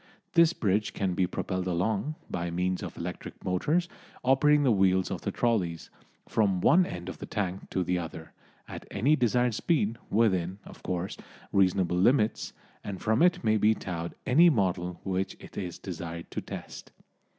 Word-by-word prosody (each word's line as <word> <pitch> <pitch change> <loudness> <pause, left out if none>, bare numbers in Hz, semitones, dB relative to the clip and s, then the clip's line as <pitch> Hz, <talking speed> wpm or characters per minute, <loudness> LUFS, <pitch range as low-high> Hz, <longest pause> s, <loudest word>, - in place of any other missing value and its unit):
This 170 -1 +6
bridge 105 - 0
can 95 -2 0
be 90 0 +1
propelled 95 0 -3
along, 100 - -1
by 85 -1 -3
means 90 +2 -1
of - - -7
electric - - -7
motors 150 - +1 0.4
operating 145 +3 +4
the 130 - +4
wheels 95 -2 +3
of - - -3
the - - -2
trollys, 95 -9 -1 0.4
from 100 -4 +1
one 175 - +5
end 90 0 -7
of 95 - -7
the - - -7
tank 95 -2 -3
to 95 - 0
the 90 0 0
other, 80 -1 -8 0.3
at - - -9
any 135 +10 +2
desired 125 -2 +2
speed, 115 -4 0
within, 95 -4 +1
of - - -13
course, 90 0 -3 0.4
reasonable 90 -2 +2
limits, 110 +3 +2 0.3
and 100 -2 -5
from 110 +2 +1
it 180 -4 +3
may 110 -1 +3
be 110 +1 +4
towed 85 -4 -5
any 160 +7 +6
model 90 - 0
which 95 0 -2
it - - -13
is 90 -3 -4
desired 85 -2 -7
to - - -3
test. - - -9
95 Hz, 170 wpm, -28 LUFS, 90-120 Hz, 0.4 s, This